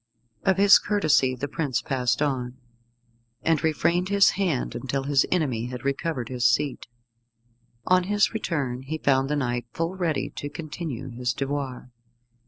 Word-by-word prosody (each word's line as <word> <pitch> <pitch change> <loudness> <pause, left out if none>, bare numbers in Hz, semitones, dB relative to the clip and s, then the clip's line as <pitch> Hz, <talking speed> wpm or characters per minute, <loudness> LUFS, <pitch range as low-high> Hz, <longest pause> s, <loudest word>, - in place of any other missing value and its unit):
Of 190 -1 +3
his 200 0 +7
courtesy 155 -10 +2
the 135 +3 -4
prince 140 -4 -1
passed 130 +2 0
on, 130 -3 -2 0.9
and 160 -3 +2
refrained 170 +3 +1
his 200 -1 +5
hand 180 -9 -1
until 135 +1 -3
his 140 0 +2
enemy 130 -10 0
had 125 0 -7
recovered 140 -2 -2
his 125 -1 -4
seat. 145 -2 0 1.0
On 185 0 +3
his 205 +2 +2
return 140 - -2
he 150 +4 -4
found 135 -2 +2
the 150 - +1
knight 120 -4 -2
full 165 +2 -2
ready 170 -6 -1
to 145 - -4
continue 150 -4 -6
his 120 0 -2
devoir. 135 -3 -4
145 Hz, 150 wpm, -25 LUFS, 130-165 Hz, 1.0 s, his